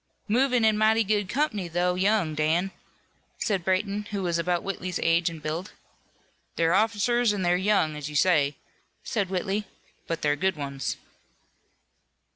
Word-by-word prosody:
"Movin' 250 +1 +2
in 215 -1 +3
mighty 220 +1 +4
good 205 -2 0
comp'ny, 230 - -1
though 175 +2 0
young, 190 -3 +1
Dan," 160 +5 +1 0.7
said 195 -5 -1
Brayton, 200 +3 -1
who 200 -2 -3
was 170 -1 0
about 175 0 0
Whitley's 185 -3 -3
age 165 +1 +2
and 160 -2 -10
build. 165 +5 -4 0.8
"They're 165 +1 +2
officers, 225 +3 +2
an' 190 - -2
they're 175 0 +3
young, 185 -5 +1
as 150 0 -5
you 150 - -8
say," 145 -4 +3 0.5
said 205 -6 -1
Whitley, 195 +2 -1 0.4
"but 165 -1 -3
they're 145 -1 +2
good 190 +4 0
ones." 140 -2 -4
185 Hz, 150 wpm, -26 LUFS, 165-210 Hz, 0.8 s, mighty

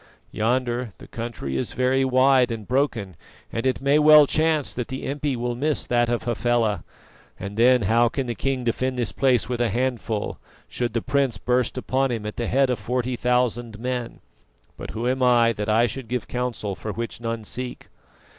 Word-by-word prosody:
Yonder 120 0 -1
the - - -13
country 115 - -5
is 65 - -2
very 130 +1 +2
wide, 130 -1 +4
and 115 -3 -5
broken, 120 - 0 0.4
and 115 +3 -1
it 130 - 0
may 140 +2 +3
well 150 0 +8
chance 155 0 +1
that 120 -2 -4
the 130 0 -6
impi 140 0 -2
will 120 0 -2
miss 145 +4 0
that 120 -1 +1
of 120 -1 -1
Hafela, 120 -4 0 0.6
and 100 +1 -6
then 125 +1 +4
how 115 +4 +3
can 135 +2 -3
the 120 - -2
king 135 +1 -2
defend 130 +2 -1
this 120 - 0
place 130 -4 +2
with 120 0 -2
a 120 - +2
handful, 120 -2 -2 0.3
should 120 -2 -3
the 115 - -1
prince 135 -4 +1
burst 125 +4 0
upon 130 +1 0
him 115 -3 -3
at 105 - -5
the 120 - -2
head 135 0 +2
of 120 - -2
forty 125 +4 -2
thousand 120 -2 0
men? 125 0 -4 0.5
But - - -8
who 115 +2 -3
am 130 +1 0
I 120 -2 +4
that 105 -1 -4
I 115 +2 +4
should 125 0 -5
give 125 0 -3
counsel 125 -5 -3
for 110 +3 -5
which 115 +2 -5
none 115 -1 -3
seek?" 125 +3 -6
120 Hz, 195 wpm, -24 LUFS, 115-130 Hz, 0.6 s, well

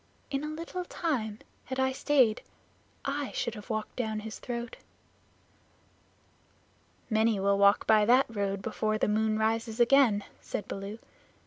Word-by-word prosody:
"In 275 +1 -1
a - - -3
little 335 +4 -5
time, 255 -13 -2 0.3
had 260 0 -4
I 265 0 +2
stayed, 260 -5 +3 0.6
I 280 0 -2
should 235 - -2
have 210 +1 -10
walked 215 -1 -3
down 220 -3 -2
his 220 0 -7
throat." 235 -1 -5 2.3
"Many 220 -1 +2
will 200 +1 +2
walk 200 +1 +5
by 215 -1 +5
that 250 +4 +5
road 200 -3 -2
before 215 0 -1
the - - +1
moon 215 +1 +1
rises 225 +1 -1
again," 240 -4 +5 0.2
said 205 - -5
Baloo. 195 +2 -6
220 Hz, 140 wpm, -29 LUFS, 215-260 Hz, 2.3 s, walk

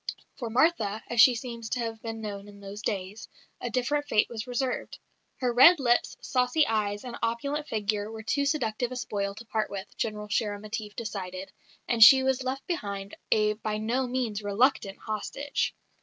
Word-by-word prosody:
For 235 -4 -3
Martha 225 -5 +2
(as 235 -1 +5
she 250 0 +7
seems 235 -1 -6
to 250 - -1
have 225 -1 -4
been 225 -1 -5
known 205 -2 -6
in 205 0 -13
those 200 +1 -8
days) 205 +3 -4 0.3
a 245 - -2
different 290 +5 0
fate 210 - +3
was 235 +1 -5
reserved. 250 +1 -2 0.4
Her 250 -2 0
red 300 +8 +8
lips, 240 -3 +2
saucy 255 +4 +2
eyes, 205 -2 -1
and 245 -2 -6
opulent 280 +6 -1
figure 210 0 -1
were 220 0 -7
too 280 +6 0
seductive 245 -4 -1
a - - -4
spoil 200 -5 -3
to 235 +3 -10
part 215 -1 -1
with, 195 0 -7
General 210 -1 -3
Shérémétief 210 0 -3
decided, 190 -4 -5 0.4
and 230 -2 +6
she 265 +4 +9
was 265 -1 +1
left 260 +1 -3
behind, 200 - -4 0.2
a 210 -1 +3
by 215 0 -3
no 240 +4 0
means 245 -4 -2
reluctant 205 0 +1
hostage. 250 +6 -3
225 Hz, 175 wpm, -28 LUFS, 210-255 Hz, 0.4 s, she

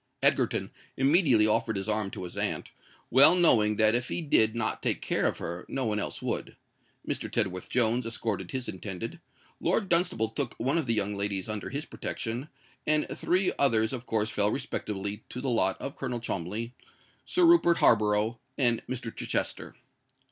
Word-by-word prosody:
Egerton - - +2 0.3
immediately 135 - +4
offered 110 +1 +1
his 95 +1 -4
arm 105 -2 0
to - - -7
his 90 - -8
aunt, - - -2 0.4
well 135 +7 +8
knowing 110 -12 +4
that 110 0 +3
if 120 +1 0
he - - -3
did 115 -8 +2
not 115 -1 -2
take - - 0
care - - 0
of - - -2
her 85 +1 -6
no 135 -1 -2
one 105 -1 -1
else - - -5
would: - - -4 0.5
Mr. - - -3
Tedworth 90 0 -1
Jones 120 0 +2
escorted 110 -5 -3
his 130 -2 -4
intended; 100 - -6 0.4
Lord 190 +3 0
Dunstable 170 - +3
took 120 +1 -3
one 135 +8 0
of 150 - -4
the 115 - +2
young 105 -1 0
ladies 100 -1 -2
under 110 -2 -4
his 145 +3 -4
protection; 120 +6 -5 0.4
and 155 0 +3
the - - -6
three 185 +2 +1
others 110 -5 +2
of 125 -1 -6
course 110 0 0
fell 105 0 +3
respectively 105 -5 -4
to 125 - -6
the 130 0 -2
lot 95 -5 +2
of 135 - -6
Colonel 120 -1 -4
Cholmondeley, 110 +2 -4 0.5
Sir 360 -1 +2
Rupert 335 - +5
Harborough, 105 +1 +3 0.2
and 120 -4 +3
Mr. 120 -3 -5
Chichester. - - -3
115 Hz, 175 wpm, -28 LUFS, 105-135 Hz, 0.5 s, well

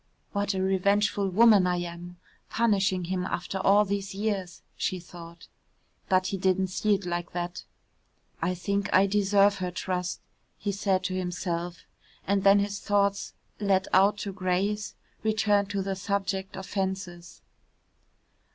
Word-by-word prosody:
"What 200 0 -1
a 190 - 0
revengeful 200 +1 +2
woman 210 -1 +6
I 180 - +1
am, 175 +1 -8 0.3
punishing 195 -5 +1
him 180 +1 -2
after 185 +1 -3
all 200 +2 +4
these 195 -1 -3
years," 200 -4 -3
she 185 - -2
thought. 170 -1 -12 0.6
But 185 -1 +3
he - - 0
didn't 190 0 +1
see 210 +3 +1
it 195 -1 -6
like 175 0 -3
that. 175 0 -4 0.8
"I 180 - 0
think 200 +2 -2
I 190 +1 +5
deserve 200 0 +3
her 180 -1 -2
trust," 180 0 -3 0.4
he 205 - -2
said 195 -2 0
to 185 0 -2
himself, 175 -1 -3 0.4
and 200 0 +1
then 200 +1 +7
his 200 0 -1
thoughts, 200 -1 0 0.3
let 195 -2 +1
out 200 +2 +5
to 200 - -4
graze, 195 +3 -1 0.3
returned 210 -2 +2
to 200 -2 -2
the 195 0 -2
subject 195 -1 -2
of 190 - -6
fences. 190 -3 -4
190 Hz, 145 wpm, -27 LUFS, 180-200 Hz, 0.8 s, then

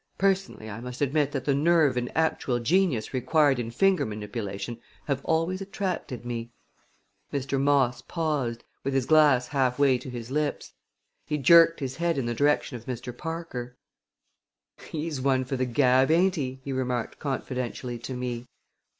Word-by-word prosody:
Personally 195 - 0
I 110 0 -6
must 125 +1 -7
admit 145 0 +1
that 135 -3 -3
the 140 - +2
nerve 150 -1 +3
and 125 0 -2
actual 160 -6 +1
genius 140 - +1
required 140 +1 +3
in 115 -1 -3
finger 190 +10 +3
manipulation 105 +1 -5 0.2
have 140 -2 -2
always 165 +4 0
attracted 190 - -4
me." 120 -1 -4 0.8
Mr. 135 -1 -1
Moss 135 -4 +2
paused, 140 -6 -2 0.2
with 135 0 -1
his 135 -2 +2
glass 145 -4 +5
halfway 130 -1 +2
to 130 - -8
his 120 0 -7
lips. 150 +1 -2 0.5
He 150 - 0
jerked 165 +3 +6
his 130 -1 -4
head 170 -1 0
in 135 - -1
the 120 - -1
direction 145 +1 +1
of 115 - -14
Mr. 125 -1 -5
Parker. 145 -6 -6 1.1
"He 155 -1 -3
is 150 -5 -4
one 130 -1 +2
for 135 - -3
the 130 0 0
gab, 130 +1 +3
ain't 180 +4 +4
he?" 130 -5 -4
he 135 - -4
remarked 125 -3 -2
confidentially 125 -3 -4
to 130 +2 -6
me. 125 -1 -4
135 Hz, 160 wpm, -27 LUFS, 125-155 Hz, 1.1 s, jerked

